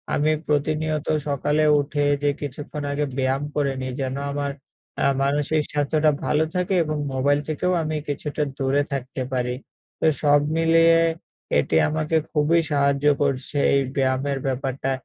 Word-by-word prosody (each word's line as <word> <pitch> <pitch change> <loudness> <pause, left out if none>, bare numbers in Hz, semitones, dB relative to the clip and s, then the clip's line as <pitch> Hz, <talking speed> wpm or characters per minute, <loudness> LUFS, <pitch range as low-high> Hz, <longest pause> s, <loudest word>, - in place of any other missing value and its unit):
আমি 150 +2 +2 0.2
প্রতিনিয়ত 155 +1 0 0.2
সকালে 150 +2 +1 0.2
উঠে 145 0 -1 0.2
যে 145 - +3
কিছুক্ষণ 145 +1 -6
আগে 145 +1 0
ব্যায়াম 135 +1 0
করে 140 -2 +1
নেই, 130 0 -3
যেন 130 0 -2 0.2
আমার 140 0 -2 0.5
আ - - +4 0.2
মানসিক 145 +2 +1
স্বাস্থ্যটা 150 +1 +2
ভালো 150 +1 +2
থাকে 180 +1 0
এবং 155 -1 -3 0.2
মোবাইল 140 +2 +2
থেকেও 155 +4 0
আমি 155 0 -2
কিছুটা 150 +1 -2
দূরে 135 +1 +1
থাকতে 130 0 -4
পারি। 125 -1 -1 0.4
তো - - +2 0.2
সব 145 0 +5 0.2
মিলিয়ে 165 0 +5 0.6
এটি - - 0
আমাকে 155 +1 0
খুবই 155 +2 +3
সাহায্য 140 0 +1 0.2
করছে, 140 0 -1 0.2
এই 140 - +3 0.2
ব্যায়ামের 135 +1 0
ব্যাপারটা। 135 0 -2
145 Hz, 145 wpm, -23 LUFS, 135-155 Hz, 0.6 s, সব